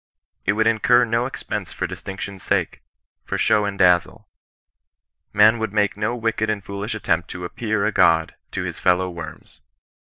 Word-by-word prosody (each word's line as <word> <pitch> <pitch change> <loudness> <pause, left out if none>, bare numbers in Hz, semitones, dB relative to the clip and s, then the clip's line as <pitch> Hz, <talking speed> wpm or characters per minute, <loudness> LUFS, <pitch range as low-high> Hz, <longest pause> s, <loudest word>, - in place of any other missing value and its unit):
It 100 - +4
would 110 +1 +1
incur 120 +2 +4
no 115 +2 0
expense - - -5
for - - -3
distinction's 95 0 -7
saie - - -1 0.2
— - - -58
for - - -2
show 105 -1 +3
and 100 -1 -3
dazzle. 90 -2 +2 1.0
Man 110 +3 +5
would 110 -2 -3
make 105 -1 +1
no 105 +3 -1
wicked 115 -2 -1
and 105 -2 -2
foolish 100 +4 -5
attempt 85 -5 -1
to 90 0 -6
appear 110 +2 -1
a 110 - +1
god 80 -5 +3 0.2
to - - -2
his - - -5
fellow 90 +1 +2
worms. 80 -2 -10
105 Hz, 175 wpm, -22 LUFS, 90-110 Hz, 1.0 s, Man